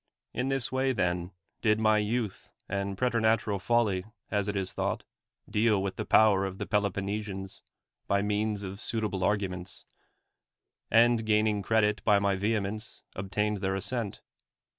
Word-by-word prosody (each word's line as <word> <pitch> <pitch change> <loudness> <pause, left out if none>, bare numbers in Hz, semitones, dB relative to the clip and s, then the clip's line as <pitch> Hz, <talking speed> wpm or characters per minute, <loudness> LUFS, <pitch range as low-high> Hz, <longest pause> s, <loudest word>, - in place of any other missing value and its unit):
In 125 +2 -1
this 135 -3 +1
way, 130 0 +1
then, 90 -4 0 0.3
did 110 -1 +3
my 110 -1 +4
youth 110 -1 -2 0.2
and 100 0 -2
preter 120 -1 +1
natural 110 -2 +2
folly, 100 -2 +1 0.3
as 105 -1 0
it 105 - -2
is 95 -2 -2
thought, - - -2 0.4
deal 105 -1 +2
with 95 -1 -3
the - - -4
power 105 -3 +5
of 95 -1 -4
the - - -3
Peloponnesians 100 -1 -2 0.5
by 100 0 +2
means 105 0 -1
of 95 +1 -6
suita 110 -2 -2
ble 95 -2 -2
arguments; 95 -3 -2 1.0
and, 115 0 +5
gaining 105 -1 +2
credit 105 0 +2
by 105 -2 +5
my 100 -1 +2
vehe 105 +3 +1
mence, 110 +3 -5
obtained 105 +2 -1
their 95 0 -1
assent. 105 +1 -3
105 Hz, 155 wpm, -29 LUFS, 95-110 Hz, 1.0 s, power